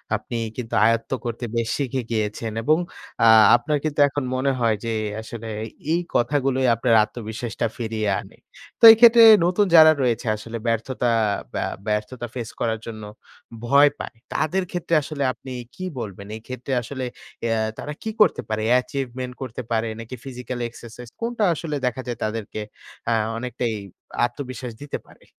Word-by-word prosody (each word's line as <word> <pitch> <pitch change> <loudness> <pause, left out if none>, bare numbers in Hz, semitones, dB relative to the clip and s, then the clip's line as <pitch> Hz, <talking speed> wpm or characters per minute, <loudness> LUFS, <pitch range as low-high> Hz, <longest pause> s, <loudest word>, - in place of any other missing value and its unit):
আপনি 120 - -5 0.2
কিন্তু 120 -2 -6
আয়ত্ত 115 +2 +1
করতে 120 +1 -3
বেশ 115 -1 0
শিখে 135 -2 -1
গিয়েছেন 110 +1 -2
এবং 155 +6 +4 0.5
আ - - +7 0.3
আপনার 150 +5 0
কিন্তু 150 -2 -2
এখন 140 0 -3
মনে 135 +2 +1
হয় 115 -2 +2
যে 115 - -1 0.3
আসলে 115 0 -8 0.5
এই 170 - +2 0.2
কথাগুলোই 130 +1 +1
আপনার 115 0 +1
আত্মবিশ্বাসটা 110 +1 -4
ফিরিয়ে 110 -2 -2
আনে। - - -12 0.4
তো - - -21
এই 225 - +7
ক্ষেত্রে 235 -1 +8 0.2
নতুন 185 +4 +3
যারা 155 -1 +9
রয়েছে 120 0 0
আসলে 115 +2 -7
ব্যর্থতা 115 +2 -1 0.5
বা - - -1 0.2
ব্যর্থতা 105 +4 -2
ফেস 120 -2 -4
করার 110 -1 -1
জন্য 110 -2 -7 0.6
ভয় 140 +4 +6
পায়। - - -7 0.2
তাদের 185 +5 0
ক্ষেত্রে 175 -1 -3
আসলে 140 -1 -4
আপনি 130 - -11 0.2
কি 185 - -7 0.2
বলবেন? 100 -2 -7
এই - - -14
ক্ষেত্রে 130 +1 -5
আসলে 135 +4 -8 0.5
এ - - -1 0.3
তারা 150 - -5
কি 220 - -3
করতে - - +4
পারে? 110 0 -1 0.2
Achievement 125 -2 -5
করতে 130 -1 -5
পারে 115 0 +1
নাকি 115 +3 -7
ফিজিক্যাল 125 -1 -6
এক্সারসাইজ 120 0 -11
কোনটা 230 -2 -1
আসলে 155 -1 -4
দেখা 125 +1 -1
যায় 120 - -3
তাদেরকে 110 0 -4 0.5
আ - - +4 0.2
অনেকটাই 120 -1 -3 0.5
আত্মবিশ্বাস 125 -1 -6
দিতে 145 - -4
পারে? - - -20
125 Hz, 160 wpm, -23 LUFS, 115-140 Hz, 0.6 s, যারা